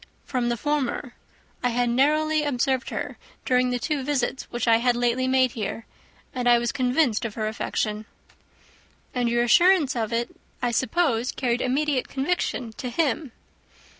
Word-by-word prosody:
"From 245 -2 -1
the 240 - -1
former. 280 -2 -2 0.5
I 250 - +1
had 245 +1 +1
narrowly 305 +5 +2
observed 265 -2 0
her, - - -5 0.3
during 250 0 +2
the 250 - 0
two 290 +3 -2
visits 265 -2 -1
which 240 0 -3
I 225 -1 +6
had 245 +1 +2
lately 245 +1 +1
made 260 -1 +3
her - - -15
here; 220 0 -4 0.5
and 245 -1 0
I 240 - +7
was 235 0 -1
convinced 255 -3 +1
of 225 -3 -4
her 215 -1 -2
affection." 215 -1 -2 1.1
"And 245 -2 0
your 240 0 +2
assurance 345 +2 +4
of 225 -2 -2
it, 235 +1 -2 0.2
I 245 -1 0
suppose, 260 -1 +1
carried 245 -2 -1
immediate 270 +1 0
conviction 265 -5 -2
to 250 - -3
him." 280 0 -1
250 Hz, 165 wpm, -25 LUFS, 235-275 Hz, 1.1 s, I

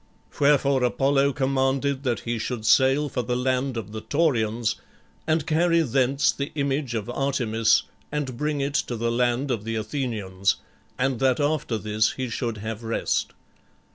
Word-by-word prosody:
Wherefore 140 -2 +3
Apollo 135 +3 +2
commanded 135 0 0
that 120 -6 -1
he 120 -1 -3
should 110 -1 -4
sail 135 +5 +4
for 125 - -2
the 125 0 -2
land 130 0 0
of 105 -3 -5
the 110 0 -6
Taurians 120 -8 0 0.5
and 160 -2 +1
carry 170 +1 +3
thence 135 +1 +2
the 140 0 -4
image 140 -3 -1
of 110 -1 -3
Artemis 120 -4 +1 0.3
and 145 -4 -3
bring 150 +2 -1
it 140 +1 -2
to 125 - -1
the 115 +1 -1
land 125 +3 +1
of 115 -4 -2
the 115 +1 -3
Athenians, 110 -5 -1 0.4
and 130 -2 0
that 130 0 +2
after 145 -5 0
this 105 0 0
he 130 -2 -4
should 115 -1 -3
have 110 +1 -5
rest. 115 0 -1
130 Hz, 160 wpm, -25 LUFS, 115-140 Hz, 0.5 s, sail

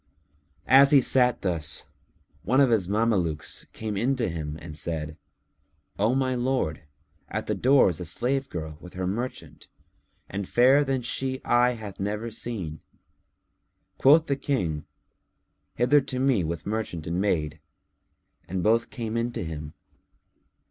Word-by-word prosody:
As 135 +1 +7
he 140 - +7
sat 125 -1 +2
thus 80 -4 0 0.6
one 130 - +2
of 135 -3 +5
his 105 -6 +2
Mamelukes 100 -7 -1
came 110 -2 -5
in 125 +7 +1
to 120 -6 -1
him 80 -2 -5
and 80 -2 -9
said, 80 0 -3 0.8
"O 110 +5 +2
my 130 -1 +1
lord, 125 -10 -1 0.5
at - - -3
the - - -1
door 135 +2 +4
is 85 -5 -1
a 90 - -4
slave 135 - -1
girl 80 -3 -6
with 90 - -12
her 95 0 -2
merchant, 115 +7 -5 0.6
and 100 -1 -5
fairer 130 +4 +5
than 135 -2 -1
she 130 +2 -2
eye 120 +1 +4
hath 105 -4 -9
never 105 +4 -3
seen." 100 -9 -5 1.2
Quoth 155 +4 +6
the 140 - 0
King, 90 - -2 0.9
"Hither 130 +5 +4
to 130 - -5
me 130 -7 +2
with 85 0 -4
merchant 105 -7 -3
and 85 +3 -1
maid!"; 80 -6 -1 0.9
and 95 0 -3
both 115 +2 +2
came 115 -3 -5
in 115 +1 0
to - - -3
him. 75 -2 -7
110 Hz, 150 wpm, -26 LUFS, 85-130 Hz, 1.2 s, As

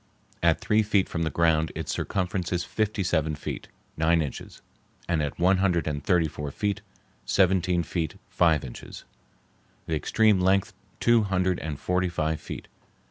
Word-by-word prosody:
At 85 -1 +3
three 110 +1 +2
feet 105 -2 +2
from 85 - -3
the 80 - +1
ground 80 -1 +2
its - - -3
circumference 90 -1 -2
is 90 -1 0
fifty 105 +3 -1
seven 80 -4 0
feet, 75 - -6 0.3
nine 80 +1 +3
inches; 70 - -8 0.4
at 75 -5 -1
one 95 +2 +4
hundred 90 -5 +1
and 75 -2 -3
thirty 90 -3 +3
four 75 -1 -5
feet, 100 +7 -2 0.4
seventeen 90 -2 +2
feet 80 0 -3
five 80 -5 +2
inches; 60 - -9 0.8
the 80 - -3
extreme 105 +4 +3
length 95 +1 +2 0.3
two 120 -1 +4
hundred 95 -2 +1
and 75 -3 -5
forty 90 0 0
five 80 -2 -1
feet.... - - -7
85 Hz, 155 wpm, -26 LUFS, 80-95 Hz, 0.8 s, one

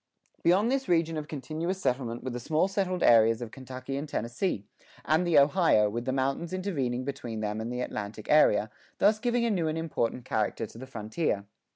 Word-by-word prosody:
[6:1] - - -35
Beyond 195 +8 +4
this 270 -4 -1
region 165 -2 +2
of 155 -1 -4
continuous 160 +6 -4
settlement 125 -6 -2
were 130 - -3
the 120 - -4
small 155 +8 +1
settled 190 -2 -1
areas 115 -1 +6
of 120 -3 -6
Kentucky 130 0 -6
and 145 +2 -5
Tennessee, 115 - -2 0.4
and 160 +4 +2
the 165 -3 +4
Ohio, 140 - +4
with 120 +2 -4
the - - 0
mountains 135 +6 -1
intervening 140 -10 -2
between 125 -5 -5
them 105 0 -2
and 115 +2 -4
the 125 0 -3
Atlantic 105 -3 -5
area, 110 -8 +4 0.3
thus 215 +1 +4
giving 240 +1 +1
a 230 - +1
new 175 -5 0
and 155 +1 -1
important 130 -7 -2
character 110 +1 -1
to 110 - -13
the 130 - -8
frontier. 110 -2 -2
135 Hz, 200 wpm, -28 LUFS, 115-170 Hz, 0.4 s, areas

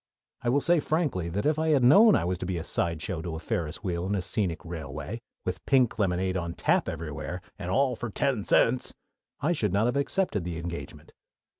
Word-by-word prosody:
I 120 - 0
will 140 +4 +3
say 170 +2 +4
frankly 145 - 0
that 100 +5 -2
if 155 +1 +2
I 160 - +1
had 140 -5 +4
known 200 - +8
that - - +3
I - - -2
was 90 0 -1
to - - -4
be 90 -2 -1
a 80 - -3
sideshow 85 +1 -2
to 85 -1 -4
a - - -5
Ferris 80 +1 -3
Wheel 90 -2 -2
and 100 - 0
a 95 - 0
scenic 90 -2 -1
railway, 80 +5 -6 0.2
with - - -3
pink 130 -5 +3
lemonade 95 -1 +1
on 85 -2 -3
tap - - +2
everywhere, 80 +2 -5 0.2
and 90 -3 -4
"all 130 +5 +2
for 120 - -5
ten 115 0 0
cents," 125 +5 +2 0.5
I 155 - +2
should 105 - 0
not 100 +3 +3
have 125 +3 +1
accepted 140 - 0
the 85 -1 -4
engagement. 85 0 -7
95 Hz, 215 wpm, -28 LUFS, 85-130 Hz, 0.5 s, known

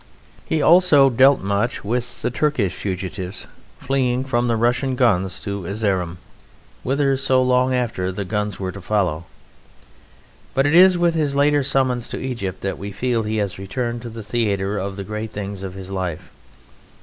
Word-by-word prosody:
He 155 -2 0
also 155 -6 +6
dealt 135 +3 +5
much 100 +3 -1
with 120 +3 -3
the - - 0
Turkish 125 -8 0
fugitives 95 0 -5 0.3
fleeing 130 -1 0
from 120 -2 0
the 115 - +1
Russian 125 +3 +1
guns 95 -8 +1
to 100 -1 -4
Erzerum 95 -5 -1 0.6
whither, 135 +1 +1
so 130 -1 +2
long 130 0 +2
after, 115 -7 -1
the 100 +1 -4
guns 105 +1 -2
were 95 -1 -3
to 100 - -9
follow. 90 -5 0 1.3
But 135 - +3
it 145 - +2
is 180 +1 +7
with 175 -1 +2
his 150 -4 0
later 145 +1 +3
summons 130 -3 0
to - - -5
Egypt 100 -8 -4
that 95 - -3
we 100 +1 -6
feel 120 +3 0
he 110 0 -2
has 100 -3 -2
returned 120 +4 -3
to 120 - -7
the 115 -1 -8
theatre 100 -2 -1
of 95 0 -4
the 100 - -5
great 110 +2 -5
things 100 -1 -5
of 95 -1 -6
his 95 0 -8
life. 90 -4 -4
115 Hz, 175 wpm, -21 LUFS, 100-130 Hz, 1.3 s, is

